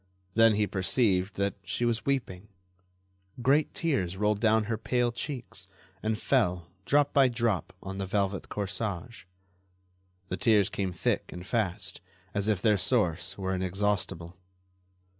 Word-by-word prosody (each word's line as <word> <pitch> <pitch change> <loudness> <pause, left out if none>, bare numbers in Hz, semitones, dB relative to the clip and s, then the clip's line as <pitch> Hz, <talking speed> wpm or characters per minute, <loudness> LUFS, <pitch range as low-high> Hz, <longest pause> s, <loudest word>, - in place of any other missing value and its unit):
Then 115 0 +5
he 105 0 +2
perceived 95 0 +1
that 100 0 0
she 120 +6 0
was 115 +1 0
weeping. 105 -8 -1 0.9
Great 140 +5 +3
tears 95 - -1
rolled 105 0 +1
down 110 0 +3
her 110 +1 -1
pale 120 +2 0
cheeks 120 -7 -6 0.3
and 110 0 0
fell, 90 -9 +1 0.2
drop 145 0 +3
by 135 -2 +6
drop, 115 -5 0
on 95 0 -6
the 95 - -2
velvet 100 -1 -1
corsage. 100 +1 -4 1.0
The 90 - -2
tears 105 0 +3
came 95 -2 -2
thick 85 - -1
and 90 0 -8
fast, 100 -4 -2 0.3
as 100 0 -1
if 105 -4 +1
their 105 -3 +4
source 95 -7 +1
were 95 -1 -2
inexhaustible. 95 -2 -1
105 Hz, 140 wpm, -29 LUFS, 95-115 Hz, 1.0 s, by